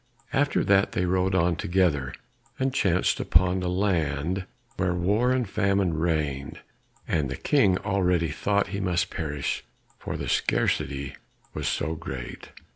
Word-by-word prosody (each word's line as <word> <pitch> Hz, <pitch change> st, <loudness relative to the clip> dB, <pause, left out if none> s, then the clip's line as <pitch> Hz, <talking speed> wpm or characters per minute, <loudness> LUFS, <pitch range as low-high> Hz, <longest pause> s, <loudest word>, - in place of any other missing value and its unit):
After 145 Hz, +1 st, +2 dB
that 100 Hz, 0 st, +3 dB
they 90 Hz, -, 0 dB
rode 95 Hz, +1 st, +1 dB
on 85 Hz, -1 st, +3 dB
together, 80 Hz, -7 st, +1 dB, 0.5 s
and 130 Hz, 0 st, 0 dB
chanced 95 Hz, -8 st, +2 dB
upon 90 Hz, +3 st, +3 dB
a 90 Hz, -, -2 dB
land 90 Hz, -2 st, 0 dB, 0.3 s
where 90 Hz, -1 st, 0 dB
war 105 Hz, +8 st, +2 dB
and 130 Hz, -3 st, +1 dB
famine 100 Hz, -2 st, +1 dB
reigned, 75 Hz, -4 st, -1 dB, 0.5 s
and 75 Hz, -4 st, 0 dB
the 65 Hz, -, -4 dB
King 105 Hz, -11 st, +3 dB
already 90 Hz, -5 st, +1 dB
thought 100 Hz, +4 st, 0 dB
he 100 Hz, +1 st, -3 dB
must 90 Hz, -3 st, 0 dB
perish, 75 Hz, -3 st, -3 dB, 0.4 s
for -, -, -4 dB
the -, -, -4 dB
scarcity 70 Hz, 0 st, 0 dB, 0.4 s
was -, -, -3 dB
so 80 Hz, -, -1 dB
great. 65 Hz, -6 st, -7 dB
90 Hz, 140 wpm, -26 LUFS, 80-95 Hz, 0.5 s, that